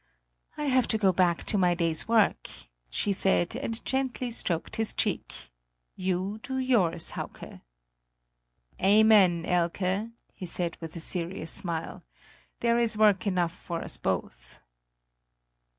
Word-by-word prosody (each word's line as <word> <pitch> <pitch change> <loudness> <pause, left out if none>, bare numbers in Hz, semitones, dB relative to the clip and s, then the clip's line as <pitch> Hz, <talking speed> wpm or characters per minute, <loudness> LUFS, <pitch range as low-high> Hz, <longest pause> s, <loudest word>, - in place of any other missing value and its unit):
"I 300 - -3
have 260 -3 +2
to 220 - +2
go 195 -3 +3
back 175 -2 +2
to 205 - 0
my 180 -1 +3
day's 165 -2 0
work," 225 -2 +2 0.4
she 200 - 0
said, 190 0 +1
and 230 -3 -4
gently 260 -2 -2
stroked 170 -6 -2
his 225 -1 0
cheek; - - -1 0.6
"you 190 +3 -2
do 265 +2 -4
yours, 195 -11 +2
Hauke." - - -8 1.2
"Amen, 195 -4 +5
Hike!" 185 +4 0 0.2
he 185 - -8
said 170 0 -2
with 165 0 -8
a - - -5
serious 170 0 -2
smile; 170 -4 -2 0.6
"there 235 0 +2
is 230 -2 +1
work 210 -1 +4
enough 175 -3 0
for 170 -2 -6
us - - -4
both." - - -4
190 Hz, 135 wpm, -28 LUFS, 170-225 Hz, 1.2 s, Amen